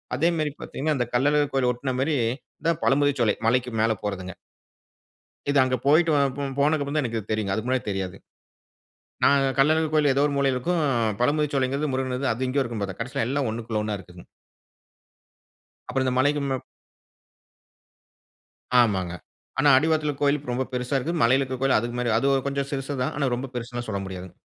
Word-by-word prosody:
அதே 150 +6 +2
மெரி 150 -1 0
பாத்தீங்கன்னா, 155 +2 -2
அந்தக் 120 -1 -3
கள்ளழகர் 145 +3 +2
கோயில 125 -2 +3
ஒட்ன 130 +2 -3
மாரி 150 +3 +1 0.5
இந்த 165 - +2
பழமுதிர்சோலை 140 -5 +3
மலைக்கு 125 +1 +2
மேல 115 - +3
போறதுங்க. 95 -3 -4 1.1
இது 145 - +2
அங்க 130 0 +1
போய்ட்டு 160 +3 +4 0.3
போ - - -3 0.2
போனதுக்கு 150 +1 +2
அப்புறம் 140 +2 -3
தான் 150 - +2
எனக்கு 115 -3 -4
தெரியுங்க, 110 -2 -1
அதுக்கு 110 +4 -3
முன்னாடி 130 0 0
தெரியாது. 95 -2 -3 1.1
நான் 140 -1 +5 0.2
கள்ளர் 155 +4 +4
கோவிலில 150 -3 +4
ஏதோ 140 - +2
ஒரு 145 - -2
மூலையில 135 -2 +2
இருக்கும், 170 +6 0 0.4
பழமுதிர்ச்சோலைங்கிறது 140 +1 +1
முருகன் 130 0 -1
அது 130 +3 -2
இங்கேயும் 135 +2 +1
இருக்கும்னு 115 -3 -4
பார்த்தேன், 95 +1 -7
கடைசியில 115 -1 -2
எல்லாம் 140 -2 0
ஒன்னுக்குள் 110 -1 -3
ஒன்னா 105 -1 -2
இருக்குங்க. 90 -1 -13 1.6
அப்புறம் 130 -1 -1
இந்த 125 - 0
மலைக்கு 145 +2 +2 2.4
ஆமாங்க, 95 -7 +2 0.5
ஆனா 145 +2 +5
அடிவாரத்தில 155 0 +1
கோவில் 145 0 +2
ரொம்ப 130 +2 -1
பெரிசா 125 +2 -2
இருக்கு, 135 +6 -2
மலையில 130 +4 +4
இருக்கிற 130 -1 -5
கோவில் 135 -1 +3
அது 120 +1 -4
மாதிரி 120 -2 +1
அது 140 0 +2
கொஞ்சம் 140 0 -2
சிருசுதான், 135 -1 -2
ஆனா, 140 - +1
ரொம்ப 130 +1 -5
பெரிசுனு 120 0 -5
சொல்ல 100 -2 -2
முடியாதுங்க. 95 -1 -9
130 Hz, 160 wpm, -25 LUFS, 115-145 Hz, 2.4 s, நான்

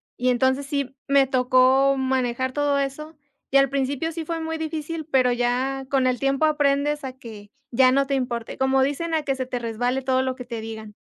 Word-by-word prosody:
y 250 +1 0
entonces 260 +3 +1
sí 275 -2 -3
me 275 -1 +4
tocó 260 +1 +3
manejar 260 -1 -1
todo 290 0 +1
eso, 280 +3 -4 0.3
y 275 - +4
al 275 -1 +4
principio 280 +4 -1
sí 325 -1 -5
fue 330 0 -3
muy 320 0 -4
difícil, 315 0 -4
pero 260 -4 +3
ya 255 +2 -1
con 265 -2 +2
el 250 -1 +1
tiempo 275 +3 +1
aprendes 295 -1 +1
a 260 -1 -5
que 215 -5 -11 0.2
ya 255 +1 +5
no 275 +1 +2
te 275 - -3
importe, 245 -4 -3
como 265 0 +3
dicen 320 +4 -1
a 310 - 0
que 275 - 0
se 260 -1 -4
te 250 - -3
resbale 245 +3 -2
todo 260 0 +1
lo 260 -1 -2
que 250 - -9
te 235 -2 -6
digan. 220 -1 -8
265 Hz, 210 wpm, -23 LUFS, 255-280 Hz, 0.3 s, ya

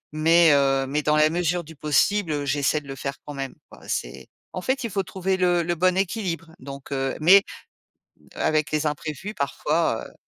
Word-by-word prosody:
Mais, 165 +1 +5
heu, 135 -1 +2
mais, 150 +2 -1
dans 150 0 +2
la 155 0 +4
mesure 175 0 0
du 160 +1 -13
possible, 155 +6 +1
heu, 145 -1 -2
j'essaie 145 +2 0
de 140 - -17
le 135 - -6
faire 140 +1 -4
quand 145 - -7
même, 135 -1 -5
quoi, - - -15
c'est 65 +1 -4 0.3
en 185 - -3
fait, 260 +2 -1
il 230 - -4
faut 195 - 0
trouver 190 0 -2
le 175 -2 +2
le 175 +1 -1
bon 185 +2 +2
équilibre, 180 -4 -2
donc, 140 +1 -10
heu 135 -1 -1
mais, 195 +5 +7 0.9
heu, - - -10
avec 155 0 +1
les 155 0 0
imprévus 155 +7 -5
parfois, 150 -2 -1
heu - - -19
155 Hz, 205 wpm, -24 LUFS, 140-180 Hz, 0.9 s, mais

